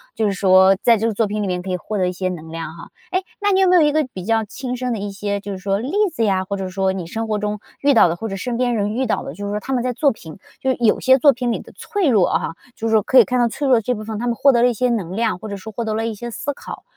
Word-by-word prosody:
就 220 Hz, -, 0 dB
是 205 Hz, -, +2 dB
说 190 Hz, 0 st, +5 dB
在 235 Hz, -, +5 dB
这 220 Hz, +1 st, -1 dB
个 230 Hz, -, +1 dB
作 220 Hz, +1 st, +1 dB
品 210 Hz, +1 st, -2 dB
里 -, -, -2 dB
面 180 Hz, -1 st, -2 dB
可 190 Hz, -, -7 dB
以 185 Hz, -, 0 dB
获 210 Hz, +4 st, -4 dB
得 185 Hz, -2 st, +1 dB
一 180 Hz, -, -2 dB
些 185 Hz, +1 st, -2 dB
能 165 Hz, -3 st, -7 dB
量 165 Hz, -1 st, -6 dB
哈。 165 Hz, -, -10 dB, 0.2 s
诶， 370 Hz, -, +1 dB, 0.2 s
那 410 Hz, 0 st, +2 dB
你 380 Hz, -, +3 dB
有 380 Hz, -, +4 dB
没 365 Hz, -, +5 dB
有 345 Hz, -, +6 dB
一 295 Hz, -, +4 dB
个 305 Hz, -2 st, +1 dB
比 185 Hz, -, -6 dB
较 225 Hz, +2 st, +1 dB
亲 250 Hz, +4 st, -5 dB
身 250 Hz, -1 st, -2 dB
的 220 Hz, -, -3 dB
一 205 Hz, 0 st, -4 dB
些 200 Hz, 0 st, -3 dB
就 205 Hz, -, -6 dB
是 195 Hz, -, -4 dB
说 195 Hz, +1 st, -1 dB
例 255 Hz, +6 st, -4 dB, 0.2 s
子 230 Hz, -, -1 dB
呀， 190 Hz, -3 st, +1 dB
或 200 Hz, -, -3 dB
者 190 Hz, -1 st, -4 dB
说 190 Hz, 0 st, 0 dB
你 185 Hz, -3 st, -5 dB
生 225 Hz, +6 st, -4 dB
活 215 Hz, -1 st, 0 dB
中 210 Hz, 0 st, -3 dB, 0.2 s
遇 285 Hz, 0 st, +4 dB
到 225 Hz, -, +6 dB
的， 170 Hz, -, -1 dB
或 225 Hz, +6 st, -5 dB
者 195 Hz, -, -4 dB
身 245 Hz, +4 st, -3 dB
边 245 Hz, 0 st, +1 dB
人 210 Hz, -1 st, -1 dB
遇 260 Hz, +3 st, 0 dB
到 -, -, 0 dB
的， -, -, -7 dB
就 205 Hz, -, -7 dB
是 200 Hz, -, -3 dB
说 210 Hz, -, -1 dB
他 265 Hz, +5 st, -4 dB
们 250 Hz, -, +1 dB
在 250 Hz, 0 st, -1 dB
作 280 Hz, +4 st, +2 dB
品 165 Hz, -5 st, -11 dB, 0.2 s
就 265 Hz, -, -1 dB
是 260 Hz, -, +1 dB
有 230 Hz, -3 st, +3 dB
些 260 Hz, +1 st, +5 dB
作 280 Hz, +1 st, +5 dB
品 245 Hz, 0 st, -2 dB
里 -, -, -2 dB
的 -, -, -13 dB
脆 405 Hz, -5 st, -1 dB
弱 215 Hz, -9 st, +4 dB
哈， 165 Hz, -, -1 dB, 0.2 s
就 225 Hz, -, -3 dB
是 -, -, -1 dB
说 220 Hz, -1 st, +4 dB
可 260 Hz, -, +2 dB
以 235 Hz, -, +9 dB
看 250 Hz, +4 st, -1 dB
到 240 Hz, -, +4 dB
脆 275 Hz, +6 st, -3 dB
弱 255 Hz, -2 st, +5 dB
的 -, -, 0 dB
这 250 Hz, +4 st, -1 dB
部 215 Hz, -, -7 dB
分， 215 Hz, -1 st, -5 dB
他 245 Hz, -, -2 dB
们 235 Hz, -, 0 dB
获 280 Hz, -, +5 dB
得 235 Hz, -2 st, +2 dB
了 245 Hz, -, +5 dB
一 245 Hz, -, -1 dB
些 250 Hz, +3 st, +1 dB
能 190 Hz, -7 st, -2 dB
量， 220 Hz, -4 st, 0 dB
或 215 Hz, -, -8 dB
者 200 Hz, -, -5 dB
说 215 Hz, +3 st, -9 dB
获 235 Hz, -, -3 dB
得 220 Hz, -1 st, -2 dB
了 225 Hz, +1 st, -1 dB
一 230 Hz, -, -2 dB
些 240 Hz, +3 st, -7 dB
思 285 Hz, +5 st, -4 dB
考， -, -, -9 dB
220 Hz, 385 characters per minute, -20 LUFS, 195-245 Hz, 0.2 s, 以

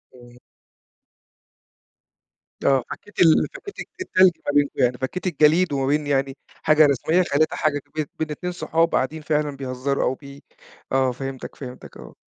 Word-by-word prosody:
إمم. 120 Hz, -1 st, -16 dB, 2.3 s
آه 135 Hz, -2 st, +4 dB
فكّيت 205 Hz, -, -10 dB
ال 165 Hz, -2 st, +5 dB
فكّيت 405 Hz, -, -10 dB
الت 370 Hz, -, -9 dB
التلج 185 Hz, -, +5 dB
ما -, -, 0 dB
بينكم 145 Hz, -1 st, +3 dB
يعني، 125 Hz, 0 st, +2 dB
فكّيت 135 Hz, +9 st, -4 dB
الجليد 160 Hz, +1 st, +3 dB
وما 135 Hz, -1 st, 0 dB
بين 150 Hz, +1 st, +1 dB
يعني 135 Hz, -1 st, 0 dB, 0.3 s
حاجة 155 Hz, 0 st, +6 dB
رسميّة، 155 Hz, +6 st, +2 dB
خلّيتها 155 Hz, -1 st, +1 dB
حاجة 145 Hz, -2 st, 0 dB
بين 155 Hz, -1 st, -1 dB
بين 155 Hz, -1 st, -2 dB
2 180 Hz, +4 st, -4 dB
صُحاب 165 Hz, -1 st, 0 dB
قاعدين 155 Hz, +4 st, -1 dB
فعلًا 150 Hz, -1 st, -1 dB
بيهزّروا 135 Hz, +1 st, -2 dB
أو -, -, +1 dB
بي 140 Hz, 0 st, -13 dB, 0.5 s
آه 130 Hz, -1 st, +2 dB
فهِمتك، 135 Hz, +1 st, -7 dB
فهِمتك، 130 Hz, -3 st, -10 dB
آه. -, -, -12 dB
145 Hz, 155 wpm, -23 LUFS, 135-160 Hz, 2.3 s, حاجة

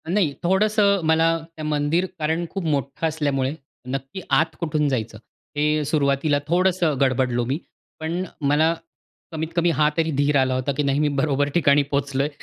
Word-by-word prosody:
नाही 175 Hz, -6 st, +1 dB
थोडंसं 200 Hz, +2 st, +3 dB
मला 165 Hz, +1 st, +3 dB, 0.2 s
त्या 155 Hz, -, -7 dB
मंदिर 150 Hz, +4 st, +1 dB
कारण 160 Hz, +3 st, 0 dB
खूप 195 Hz, -, -4 dB
मोठं 140 Hz, 0 st, -1 dB
असल्यामुळे, 145 Hz, -4 st, -1 dB, 0.3 s
नक्की 135 Hz, +7 st, -5 dB
आत 160 Hz, -1 st, +2 dB
कुठून 155 Hz, -3 st, 0 dB
जायचं? 115 Hz, -5 st, -3 dB, 0.4 s
हे 150 Hz, +1 st, +2 dB
सुरुवातीला 145 Hz, 0 st, +1 dB
थोडंसं 175 Hz, -2 st, +2 dB
गडबडलो 125 Hz, -2 st, +1 dB
मी. 135 Hz, +4 st, -1 dB, 0.4 s
पण 165 Hz, +3 st, -2 dB, 0.2 s
मला 150 Hz, +3 st, +3 dB, 0.6 s
कमीत-कमी 165 Hz, +2 st, -1 dB
हा 150 Hz, 0 st, +3 dB
तरी 160 Hz, -1 st, +1 dB
धीर 145 Hz, +1 st, +1 dB
आला 130 Hz, -1 st, +2 dB
होता 130 Hz, +2 st, -1 dB
की 150 Hz, -, +1 dB
नाही 140 Hz, 0 st, +1 dB
मी 150 Hz, -, +2 dB
बरोबर 145 Hz, 0 st, +1 dB
ठिकाणी 145 Hz, -4 st, +4 dB
पोहोचलोय. 140 Hz, 0 st, 0 dB
150 Hz, 155 wpm, -23 LUFS, 140-165 Hz, 0.6 s, ठिकाणी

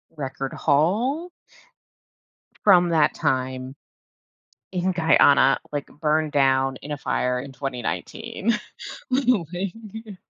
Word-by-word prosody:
Record 135 Hz, -2 st, -5 dB
haul? 235 Hz, -, +1 dB, 1.3 s
From 180 Hz, -4 st, +6 dB
that 160 Hz, -3 st, +3 dB
time, 130 Hz, -2 st, -2 dB, 1.0 s
in 185 Hz, 0 st, -1 dB
Guyana, 160 Hz, -5 st, +4 dB
like, 145 Hz, -1 st, -3 dB
burned 155 Hz, 0 st, -1 dB
down 135 Hz, -2 st, +2 dB
in 150 Hz, -, -7 dB
a -, -, -4 dB
fire 125 Hz, -2 st, -1 dB
in 135 Hz, +2 st, -6 dB
2019. 165 Hz, -, -3 dB, 0.6 s
The 260 Hz, +2 st, +2 dB
whole 210 Hz, -9 st, +2 dB
thing. 210 Hz, +3 st, -7 dB
155 Hz, 105 wpm, -23 LUFS, 135-195 Hz, 1.3 s, From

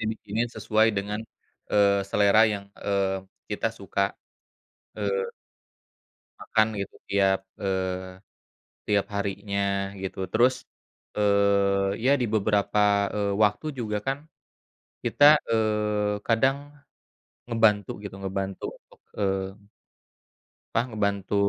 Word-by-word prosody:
dibikinin 110 Hz, +1 st, -2 dB
sesuai 110 Hz, 0 st, +2 dB
dengan, 105 Hz, +1 st, -3 dB, 0.5 s
eee, 100 Hz, -1 st, +4 dB
selera 100 Hz, +2 st, +4 dB
yang, 105 Hz, -2 st, -1 dB
eee, 95 Hz, -1 st, -1 dB, 0.2 s
kita 105 Hz, +2 st, -1 dB
suka, 100 Hz, -2 st, -2 dB, 0.8 s
eee 100 Hz, -2 st, -1 dB, 1.1 s
makan 110 Hz, 0 st, +2 dB
gitu 100 Hz, -, -6 dB
tiap 95 Hz, -1 st, +3 dB, 0.2 s
eee, 95 Hz, -1 st, -2 dB, 0.7 s
tiap 105 Hz, -1 st, +2 dB
harinya 100 Hz, -1 st, -1 dB
gitu 95 Hz, -, -5 dB
terus, 125 Hz, +2 st, +4 dB, 0.6 s
eee, 100 Hz, -1 st, +2 dB
ya 135 Hz, -, +5 dB
di 125 Hz, -, +1 dB
beberapa, 105 Hz, 0 st, +2 dB, 0.4 s
eee, 100 Hz, -1 st, 0 dB
waktu 105 Hz, +8 st, +2 dB
juga 105 Hz, -3 st, -1 dB
kan, 135 Hz, +1 st, 0 dB, 0.9 s
kita, 145 Hz, -, +4 dB, 0.3 s
eee, 105 Hz, -2 st, +1 dB
kadang, 130 Hz, +4 st, +3 dB, 0.9 s
ngebantu 110 Hz, -4 st, +3 dB
gitu 100 Hz, -1 st, -7 dB
ngebantu 95 Hz, 0 st, -4 dB
untuk, -, -, -24 dB, 0.2 s
eee 95 Hz, -1 st, 0 dB, 1.3 s
apa -, -, +4 dB
ngebantu 100 Hz, -3 st, -1 dB
100 Hz, 100 wpm, -26 LUFS, 100-110 Hz, 1.3 s, ya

